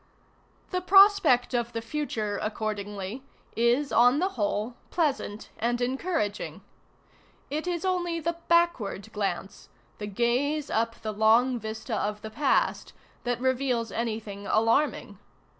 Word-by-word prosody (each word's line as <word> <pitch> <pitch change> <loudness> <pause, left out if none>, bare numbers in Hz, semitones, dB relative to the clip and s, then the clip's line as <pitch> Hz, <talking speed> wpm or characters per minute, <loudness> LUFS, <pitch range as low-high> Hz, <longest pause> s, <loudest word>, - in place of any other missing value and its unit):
The 365 -1 -1
prospect 390 -10 +5
of 240 -1 -1
the 230 - -2
future, 225 -6 -3
accordingly, 210 0 -4 0.3
is 240 +5 +2
on 245 +3 +5
the 370 +5 +1
whole 215 - -2 0.2
pleasant 275 -10 -1
and 240 +1 0
encouraging. 250 - -2 0.9
It 310 +4 -2
is 350 0 -2
only 350 -2 0
the 335 +1 -2
backward 260 - +1
glance, 195 -2 -4 0.3
the 210 - -4
gaze 250 +8 0
up 230 +1 0
the 215 -1 -3
long 230 +4 +4
vista 220 +1 -5
of 210 0 -2
the 220 - -6
past, 285 +3 +1 0.3
that 245 -1 -1
reveals 255 -2 0
anything 215 -3 -4
alarming. 225 -3 +1
235 Hz, 125 wpm, -27 LUFS, 215-295 Hz, 0.9 s, prospect